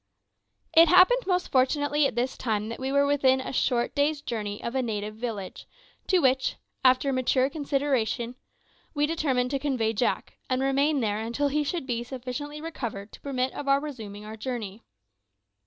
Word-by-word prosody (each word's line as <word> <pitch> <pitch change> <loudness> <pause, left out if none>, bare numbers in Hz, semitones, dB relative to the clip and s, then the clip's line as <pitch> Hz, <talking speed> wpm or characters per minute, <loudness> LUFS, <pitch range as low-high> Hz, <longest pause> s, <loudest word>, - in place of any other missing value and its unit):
It 330 +1 +8
happened 370 +9 +5
most 360 -1 0
fortunately 290 +2 +2
at - - -6
this 250 +2 -1
time 215 -3 -2
that 230 - -6
we 265 +1 -2
were 280 0 +4
within 270 -2 +3
a 260 - -5
short 245 -2 +1
day's 290 +1 +1
journey 210 -7 -4
of 235 - -3
a 265 - +1
native 215 -3 -3
village, 220 -4 -6 0.4
to 375 - +4
which, 265 -5 +2 0.3
after 260 +1 +4
mature 255 +1 +2
consideration, 275 -5 -1 0.6
we 290 0 +3
determined 275 -6 0
to 275 - 0
convey 255 -6 0
Jack, 235 +3 -1
and 255 0 +1
remain 275 +1 +2
there 210 -2 0
until 235 +6 -1
he 300 +2 +1
should 325 0 -3
be 240 -2 -2
sufficiently 260 +4 -6
recovered 235 -10 -6
to - - -13
permit 260 -2 -1
of 285 - -6
our 275 0 +4
resuming 220 -8 -7
our 215 +1 -7
journey. 220 -3 -5
260 Hz, 170 wpm, -27 LUFS, 235-290 Hz, 0.6 s, It